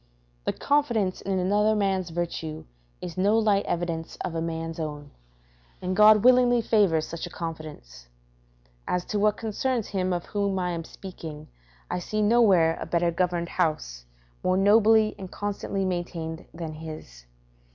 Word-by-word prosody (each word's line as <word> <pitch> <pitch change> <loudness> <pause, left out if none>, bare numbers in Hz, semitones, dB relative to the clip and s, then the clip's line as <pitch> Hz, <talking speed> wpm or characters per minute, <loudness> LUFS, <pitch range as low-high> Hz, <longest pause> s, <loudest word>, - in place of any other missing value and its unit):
The - - 0
confidence 240 -10 +1
in 195 -1 -1
another 205 +4 +2
man's 190 -3 0
virtue 165 -2 -4 0.4
is 180 0 -5
no 205 +4 +3
light 210 -3 +2
evidence 170 -1 -3
of - - -4
a 165 - -2
man's 165 0 -4
own, 150 -2 -5 0.7
and 185 0 -2
God 215 0 +7
willingly 250 -1 +5
favours 200 -9 +2
such 170 +1 -5
a - - -10
confidence. 155 - -8 0.8
As 180 0 -1
to 210 - -2
what 210 0 +2
concerns 230 +1 -2
him 185 -2 -1
of 175 -1 -2
whom 200 -2 -1
I 180 -1 -1
am 165 -1 -4
speaking, 160 -6 -9 0.4
I - - -1
see 215 +4 -2
nowhere 200 -8 +4
a - - -4
better 170 0 +1
governed 170 0 -1
house, 150 - -2 0.4
more 185 0 +2
nobly 215 +2 +5
and 190 -2 -7
constantly 200 -1 -3
maintained 170 -3 -4
than 165 -2 -6
his. 155 - -10
180 Hz, 150 wpm, -26 LUFS, 165-205 Hz, 0.8 s, God